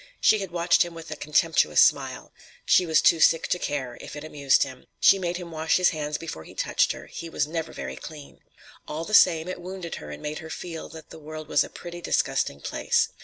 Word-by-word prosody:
She 215 Hz, -, +4 dB
had 195 Hz, -2 st, -4 dB
watched 170 Hz, 0 st, +2 dB
him 175 Hz, -1 st, 0 dB
with 165 Hz, 0 st, -9 dB
a -, -, -3 dB
contemptuous 150 Hz, -, +2 dB
smile. -, -, +2 dB, 0.3 s
She 180 Hz, -, +4 dB
was 160 Hz, -, +3 dB
too 165 Hz, -, +5 dB
sick 165 Hz, +1 st, +4 dB
to 180 Hz, -, 0 dB
care; 130 Hz, -7 st, -4 dB
if -, -, -9 dB
it 150 Hz, -, -7 dB
amused 145 Hz, -3 st, +2 dB
him—She 140 Hz, +8 st, +1 dB
made 175 Hz, -1 st, -2 dB
him 175 Hz, -2 st, -8 dB
wash 160 Hz, 0 st, +1 dB
his 180 Hz, -1 st, +4 dB
hands 150 Hz, -2 st, -3 dB
before 150 Hz, -, -7 dB
he -, -, -14 dB
touched -, -, +1 dB
her; -, -, -10 dB
he 165 Hz, -, -8 dB
was 145 Hz, -, 0 dB
never 165 Hz, +1 st, -4 dB
very -, -, -6 dB
clean. 150 Hz, -3 st, -11 dB, 0.5 s
All 160 Hz, +2 st, -4 dB
the 215 Hz, -, -7 dB
same, 170 Hz, -5 st, +5 dB
it 185 Hz, -1 st, -5 dB
wounded 180 Hz, -1 st, -6 dB
her 75 Hz, -, -9 dB
and 75 Hz, -, -9 dB
made 150 Hz, 0 st, -4 dB
her 160 Hz, -, -9 dB
feel 165 Hz, 0 st, -7 dB
that 160 Hz, -1 st, -12 dB
the 160 Hz, -, -10 dB
world 155 Hz, 0 st, -8 dB
was -, -, +3 dB
a -, -, -9 dB
pretty 175 Hz, 0 st, -9 dB
disgusting 70 Hz, -, 0 dB
place. -, -, 0 dB
160 Hz, 225 wpm, -25 LUFS, 150-175 Hz, 0.5 s, too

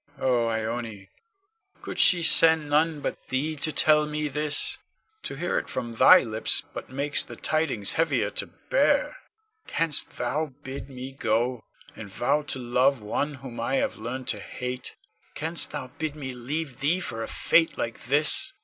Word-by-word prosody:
Con. 135 Hz, -, -6 dB
Oh, 120 Hz, -2 st, +1 dB
Ione, 110 Hz, -2 st, -4 dB, 0.7 s
could -, -, -6 dB
she 175 Hz, -2 st, +4 dB
send 160 Hz, -2 st, +7 dB
none 155 Hz, 0 st, +1 dB
but -, -, -6 dB
thee 145 Hz, +4 st, -2 dB
to 155 Hz, +2 st, 0 dB
tell 150 Hz, 0 st, +4 dB
me 150 Hz, 0 st, -3 dB
this? 150 Hz, +1 st, +2 dB, 0.4 s
To -, -, -5 dB
hear 175 Hz, +5 st, -1 dB
it -, -, -9 dB
from 120 Hz, -2 st, -5 dB
thy 115 Hz, -, +7 dB
lips 110 Hz, -1 st, +1 dB
but -, -, -8 dB
makes 140 Hz, +3 st, 0 dB
the -, -, -11 dB
tidings 150 Hz, -10 st, +1 dB
heavier 165 Hz, +1 st, 0 dB
to -, -, -3 dB, 0.2 s
bear. -, -, +2 dB, 0.5 s
Canst 160 Hz, -3 st, 0 dB
thou 135 Hz, +4 st, -2 dB
bid 135 Hz, +1 st, -8 dB
me 130 Hz, 0 st, -8 dB
go, 120 Hz, -1 st, -1 dB, 0.3 s
and 105 Hz, -2 st, -9 dB
vow 120 Hz, +9 st, 0 dB
to 145 Hz, -2 st, -4 dB
love 125 Hz, 0 st, +1 dB
one 145 Hz, +7 st, -3 dB
whom 130 Hz, -3 st, -10 dB
I 120 Hz, +4 st, -1 dB
have -, -, -1 dB
learned 125 Hz, +3 st, -6 dB
to 105 Hz, -, 0 dB
hate? 125 Hz, +4 st, -6 dB, 0.4 s
Canst 165 Hz, +2 st, +1 dB
thou 145 Hz, -4 st, -7 dB
bid 155 Hz, -2 st, -3 dB
me 135 Hz, -3 st, -6 dB
leave 135 Hz, +2 st, -5 dB
thee 155 Hz, +6 st, +1 dB
for 115 Hz, -10 st, -6 dB
a -, -, -4 dB
fate 165 Hz, -1 st, +1 dB
like 115 Hz, -1 st, -5 dB
this? 155 Hz, -, +4 dB
135 Hz, 170 wpm, -25 LUFS, 120-155 Hz, 0.7 s, send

